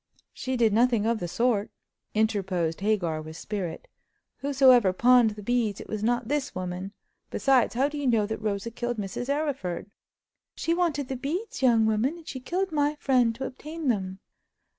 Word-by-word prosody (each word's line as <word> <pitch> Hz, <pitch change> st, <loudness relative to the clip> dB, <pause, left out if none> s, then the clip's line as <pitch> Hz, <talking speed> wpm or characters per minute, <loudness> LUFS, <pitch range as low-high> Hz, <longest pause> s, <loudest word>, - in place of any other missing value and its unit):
"She 260 Hz, -1 st, -3 dB
did 225 Hz, -3 st, +3 dB
nothing 230 Hz, -1 st, +3 dB
of 230 Hz, 0 st, +1 dB
the 175 Hz, -, -3 dB
sort!" 215 Hz, +3 st, +1 dB, 0.5 s
interposed 190 Hz, -6 st, 0 dB
Hagar, 185 Hz, -7 st, 0 dB
with 155 Hz, +1 st, -9 dB
spirit. 190 Hz, -6 st, -5 dB, 0.5 s
"Whosoever 260 Hz, -8 st, +5 dB
pawned 240 Hz, 0 st, +5 dB
the 210 Hz, -, -9 dB
beads, 230 Hz, -2 st, 0 dB
it -, -, -9 dB
was 215 Hz, -1 st, -4 dB
not 240 Hz, +1 st, +1 dB
this 290 Hz, 0 st, -2 dB
woman. 185 Hz, +2 st, -4 dB, 0.4 s
Besides, 260 Hz, -4 st, +2 dB
how 265 Hz, +3 st, +3 dB
do 295 Hz, 0 st, -5 dB
you 285 Hz, -, -1 dB
know 225 Hz, -4 st, +3 dB
that 220 Hz, +1 st, -4 dB
Rosa 210 Hz, +1 st, -2 dB
killed 240 Hz, +1 st, -3 dB
Mrs. 210 Hz, +5 st, -4 dB
Arryford?" 270 Hz, -, -2 dB, 0.6 s
"She 330 Hz, -, 0 dB
wanted 325 Hz, -6 st, 0 dB
the 265 Hz, -, -3 dB
beads, 315 Hz, -, -4 dB
young 235 Hz, -4 st, +4 dB
woman, 220 Hz, +9 st, +1 dB
and 330 Hz, -, -15 dB
she 260 Hz, -, -5 dB
killed 360 Hz, +9 st, -2 dB
my 295 Hz, -1 st, +1 dB
friend 250 Hz, -5 st, +2 dB
to 265 Hz, +3 st, -4 dB
obtain 305 Hz, +3 st, -5 dB
them." 190 Hz, -4 st, -1 dB
235 Hz, 175 wpm, -27 LUFS, 205-270 Hz, 0.6 s, Whosoever